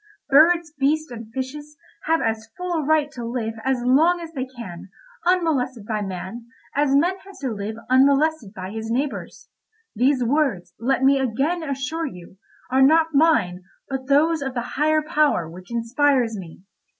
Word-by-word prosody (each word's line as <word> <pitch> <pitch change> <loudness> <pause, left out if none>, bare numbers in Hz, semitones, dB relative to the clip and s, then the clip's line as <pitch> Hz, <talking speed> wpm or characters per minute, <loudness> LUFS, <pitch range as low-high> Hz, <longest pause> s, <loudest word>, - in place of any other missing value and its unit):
Birds, 320 +3 +5
beasts, 310 +3 +1
and 225 -2 -9
fishes, 290 +4 -6 0.3
have 325 +1 +2
as 225 0 -2
full 360 0 -3
a 320 -2 0
right 300 0 +2
to 240 - -7
live 230 -1 -3
as 260 -2 0
long 315 +8 +4
as 330 -1 -9
they 260 -3 -3
can 205 -9 -9 0.4
unmolested 275 - +1
by 215 -1 -2
man, 195 +4 -6 0.3
as 285 -1 +2
man 355 +7 +2
has 395 +1 -15
to 265 -3 -3
live 210 0 -4
unmolested 275 -2 +3
by 190 -2 -7
his 220 +1 -5
neighbours. 270 +5 -3 0.5
These 255 +3 +2
words, 255 - 0
let 265 +3 0
me 275 +1 +5
again 270 +8 0
assure 305 +2 -3
you, 180 -4 -11 0.3
are 260 +1 +3
not 320 +4 +4
mine, 275 - +3 0.3
but 265 -1 -4
those 310 +3 +3
of 270 -2 -4
the 240 0 -4
higher 310 +2 +2
power 300 - +1
which 180 +5 -12
inspires 235 0 +1
me. 180 -2 -10
270 Hz, 165 wpm, -23 LUFS, 230-310 Hz, 0.5 s, Birds